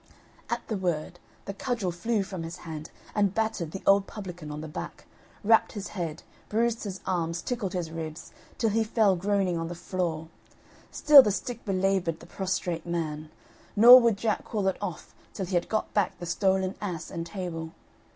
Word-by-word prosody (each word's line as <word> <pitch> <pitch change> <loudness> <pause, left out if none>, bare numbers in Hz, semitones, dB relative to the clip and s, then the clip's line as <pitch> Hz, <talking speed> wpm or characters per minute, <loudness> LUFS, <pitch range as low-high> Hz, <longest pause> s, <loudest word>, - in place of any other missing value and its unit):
At 235 0 -3
the 215 - -2
word 175 -2 -2 0.3
the 200 - -4
cudgel 220 -3 -2
flew 205 +5 0
from 190 -2 -6
his 165 +1 -6
hand 155 -1 -6 0.2
and 205 -2 +1
battered 220 -7 -1
the 190 - -7
old 195 0 +5
publican 180 -7 -8
on 150 0 -5
the 160 - -6
back, 150 - -7 0.4
rapped 225 +2 +4
his 205 -2 -5
head, 165 -5 -5 0.3
bruised 230 +1 0
his 195 -2 -5
arms 170 -1 -1
tickled 230 -7 -3
his 175 -3 -3
ribs, 160 0 -6 0.3
till 225 -3 +1
he 225 +2 +2
fell 215 -3 +3
groaning 190 -1 0
on 165 - -3
the 175 - -6
floor; 170 -2 -3 0.6
still 295 -2 +8
the 210 - +1
stick 235 +4 -4
belaboured 190 -4 0
the - - -13
prostrate 180 -3 -3
man, 155 -3 -3 0.5
nor 240 +4 +11
would 230 -4 +3
Jack 215 0 -1
call 205 -3 -2
it 190 - +1
off 180 -6 -6 0.2
till 190 - -2
he 185 - -7
had 175 -1 +1
got 215 - -1
back 205 -3 +1
the 175 - -7
stolen 190 +2 +1
ass 180 -6 -4
and 165 - -4
table. 170 -4 -5
190 Hz, 185 wpm, -28 LUFS, 170-210 Hz, 0.6 s, nor